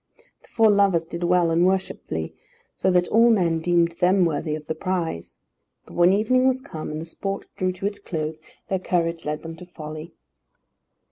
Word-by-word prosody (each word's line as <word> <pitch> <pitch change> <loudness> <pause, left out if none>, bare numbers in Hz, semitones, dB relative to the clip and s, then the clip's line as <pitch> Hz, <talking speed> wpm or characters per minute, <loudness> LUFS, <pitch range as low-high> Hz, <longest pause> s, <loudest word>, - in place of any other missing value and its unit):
The - - -22
four 225 -2 +4
lovers 195 -5 +3
did 170 +1 -6
well 175 -1 +3
and 165 +1 +3
worshipfully, 190 +1 -1 0.4
so 190 - 0
that 180 -1 +3
all 230 +2 +5
men 175 -7 +2
deemed 170 0 +2
them 185 0 +4
worthy 155 -1 -1
of 155 -1 -8
the 160 - -2
prize. 165 - -3 0.5
But - - -14
when 175 +1 +5
evening 255 +6 +3
was 260 0 +2
come, 215 - -7
and 155 0 -4
the 160 - -6
sport 195 +4 -5
drew 185 0 0
to 185 +2 -7
its 205 0 -2
close, 155 -5 -4 0.3
their 190 - -1
courage 170 -2 -1
led 150 0 -3
them 165 0 -7
to 180 - -10
folly. 155 -1 -9
175 Hz, 190 wpm, -24 LUFS, 165-195 Hz, 0.5 s, all